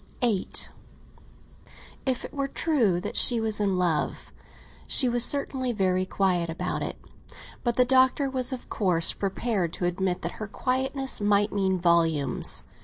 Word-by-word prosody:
VIII 225 -6 0 1.6
IF 260 -2 -1
it - - -11
were 275 -1 -3
true 250 - 0
that - - -6
she 240 -2 +5
was 220 -2 +1
in 195 -3 0
love, 175 -4 -2 0.5
she 255 - +7
was 240 -1 +5
certainly 265 -2 +2
very 185 -3 -1
quiet 180 -4 -1
about 165 - -4
it; - - -4 0.7
but 240 -1 -1
the 250 - +3
Doctor 260 +2 +2
was 260 -1 -2
of 255 -2 -7
course 180 -5 +2
prepared 195 -3 -3
to 180 - -3
admit 180 +1 -2
that 170 - -3
her 215 - -4
quietness 265 +3 -1
might 205 0 +1
mean 190 -2 0
volumes. 165 - +2
205 Hz, 150 wpm, -25 LUFS, 180-255 Hz, 1.6 s, she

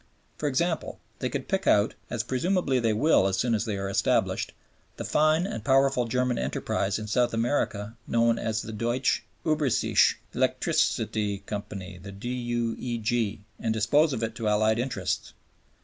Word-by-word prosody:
For 150 - -1
example, 165 +5 -1 0.2
they - - -1
could - - -4
pick - - -1
out 105 +1 +4 0.2
as 120 -3 -2
presumably 135 - +1
they 115 -2 +2
will 110 -2 +4
as 95 -1 0
soon 120 +4 +1
as 110 +1 0
they 105 -3 -2
are 95 0 -3
established 95 - +1 0.5
the - - -5
fine 155 +3 +3
and 210 - -4
powerful 135 -2 +3
German 125 +1 0
enterprise 100 +1 -1
in 110 - -5
South 120 +2 +1
America 115 -3 -1
known 115 0 +2
as 110 -1 -1
the 110 - -6
Deutsche 120 +4 0 0.2
Ueberseeische 150 -6 +3 0.2
Elektrizit‰tsgesellschaft 100 -3 -1
(the 100 +1 -8
D.U.E.G.), 120 -1 -2
and 115 - -1
dispose 145 +9 +3
of 115 -4 -2
it 110 0 -2
to 115 -1 -3
Allied 110 +2 +3
interests. 120 -7 -2
115 Hz, 150 wpm, -27 LUFS, 105-130 Hz, 0.5 s, out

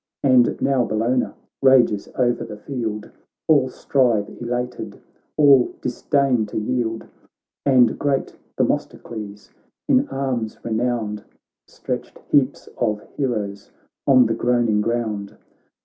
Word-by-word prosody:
And 130 -3 +4
now 135 -3 +2
Bellona 115 +3 0 0.3
rages 125 -6 +4
o'er 125 -1 +3
the 105 - -7
field, 110 -3 -5 0.4
All 140 -5 +4
strive 120 -6 +1
elated, 125 +1 -4 0.4
all 140 -4 +5
disdain 125 -3 +1
to 105 - -6
yield; 115 0 -2 0.6
And 125 -4 +4
great 140 -2 -1 0.2
Themistocles, 105 -3 -3 0.4
in - - +3
arms 130 -5 -3
re 115 - -4
nowned, 110 -3 -1 0.4
Stretched - - -6
heaps - - +2
of 105 -1 0
heroes 105 -7 -3 0.4
on 130 -3 +6
the 115 - +1
groan 120 0 +1
ing 105 -1 +2
ground. 110 -3 -2
120 Hz, 115 wpm, -22 LUFS, 110-130 Hz, 0.6 s, on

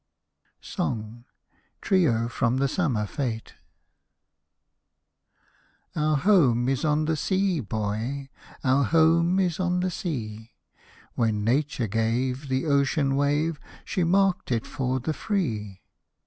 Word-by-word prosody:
TRIO 135 - +2
(FROM 120 +1 0
"THE 140 +1 +2
SUMMER 130 - 0
FETE") 115 0 -4 2.4
Our 155 0 +2
home 135 - +4
is 135 +4 0
on 155 0 +2
the 160 +1 +1
sea, 190 +1 0
boy, 110 +5 -3 0.3
Our 135 +1 +3
home 165 +3 +3
is 180 -3 0
on 180 -1 +1
the 185 0 -1
sea; 110 - -5 0.6
When 110 -3 0
Nature 130 +2 0
gave 120 +6 -1
The 130 +1 -1
ocean 140 -1 +2
wave, 145 +3 +1 0.3
She 185 - -1
marked 190 -2 +2
it 115 -2 0
for 130 -1 -2
the 155 +6 -2
Free. 110 - -3
140 Hz, 110 wpm, -26 LUFS, 115-165 Hz, 2.4 s, home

